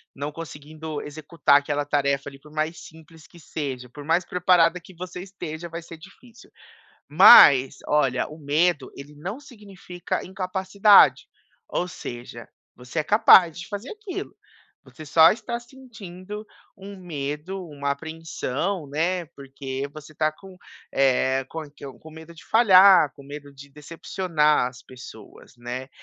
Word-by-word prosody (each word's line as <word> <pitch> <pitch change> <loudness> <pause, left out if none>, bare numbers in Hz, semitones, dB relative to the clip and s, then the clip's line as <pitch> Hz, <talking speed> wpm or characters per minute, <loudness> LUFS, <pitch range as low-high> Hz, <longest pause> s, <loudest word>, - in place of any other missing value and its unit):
não 145 +2 -5
conseguindo 155 0 -8
executar 150 0 +1
aquela 145 0 -3
tarefa 140 -1 -1
ali. 135 0 -15
Por 150 +1 -18
mais 155 +2 -3
simples 160 -1 -16
que 170 - -18
seja, 130 -6 -6
por 145 +3 -11
mais 165 +3 +1
preparada 180 -1 +2
que 185 +2 -17
você 180 +1 -8
esteja, 175 -3 -8
vai 170 +1 -7
ser 165 0 -12
difícil. 235 +8 -17 0.6
Mas 135 0 +8
olha, 135 -4 +1
o 155 +1 -12
medo 150 +1 0
ele 145 +2 -11
não 185 - -7
significa 200 -9 -7
incapacidade, 190 +2 +3 0.4
ou 180 - -2
seja, 120 -7 -9 0.3
você 125 +6 -6
é - - -1
capaz 180 -4 +5
de 175 - -8
fazer 205 +5 -7
aquilo, 415 -3 -8 0.5
você 155 - -13
só 160 +3 +6
está 235 +2 -6
sentindo 215 -5 -11 0.3
um 195 +1 -10
medo, 170 +2 -6
uma 140 -2 -5
apreensão, 160 +2 -4
né, 170 +5 -1
porque 135 0 -6
você 155 0 -12
tá 155 0 0
com, 190 +4 -15 0.4
eh, 135 0 +2
com 160 -1 -6
é 145 - -15
que 145 - -19
é - - -6
com 160 +5 -15
medo 160 +1 -13
de 165 - -16
falhar, 190 - +6
com 140 - -15
medo 145 0 -10
de 140 +1 -14
decepcionar 150 0 -1
as 125 - -15
pessoas, 125 -4 -14
né. 125 +2 -7
160 Hz, 150 wpm, -23 LUFS, 140-185 Hz, 0.6 s, Mas